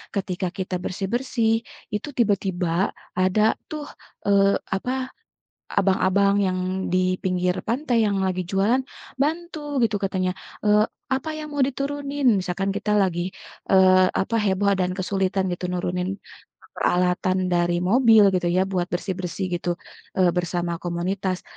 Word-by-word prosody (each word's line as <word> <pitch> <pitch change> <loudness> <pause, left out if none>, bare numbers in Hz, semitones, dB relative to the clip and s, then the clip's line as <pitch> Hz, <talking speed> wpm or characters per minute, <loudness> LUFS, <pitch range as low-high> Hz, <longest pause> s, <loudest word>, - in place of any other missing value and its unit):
ketika 185 -1 -2
kita 185 -1 -3
bersih-bersih 225 +5 -1 0.4
itu 210 +6 -2
tiba-tiba 190 -5 +1 0.3
ada 185 +3 +3 0.3
tuh, 305 -1 -5 0.4
eee, 200 0 +4 0.2
apa, 220 +6 -2 0.8
abang-abang 200 +1 +3
yang 185 -1 0 0.3
di 185 0 +2
pinggir 180 -1 +1
pantai 240 -2 +1
yang 200 -1 0
lagi 185 -1 0
jualan, 200 +8 +1 0.4
bantu 325 +3 -1 0.2
gitu 225 -2 +1
katanya, 185 -1 0 0.3
eee, 210 0 +5 0.2
"Apa 265 +3 -1
yang 305 - -6
mau 280 - +3
diturunin?" 280 +1 -1
Misalkan 185 +1 -2
kita 210 - -1
lagi, 180 -1 0 0.4
eee, 185 -1 +6
apa 230 +4 -1
heboh 200 -2 +2
dan 185 -1 0
kesulitan 190 +1 -1
gitu 180 0 -3
nurunin 180 +2 -2 0.6
peralatan 180 +1 +1
dari 175 0 +2
mobil 220 0 +6
gitu 180 -1 0
ya 180 +2 +3
buat 185 -2 -1
bersih-bersih 185 +1 -3
gitu, 175 0 -1 0.4
eee, 180 -2 +4
bersama 175 -1 -1
komunitas, 180 +2 -2
190 Hz, 130 wpm, -24 LUFS, 180-210 Hz, 0.8 s, eee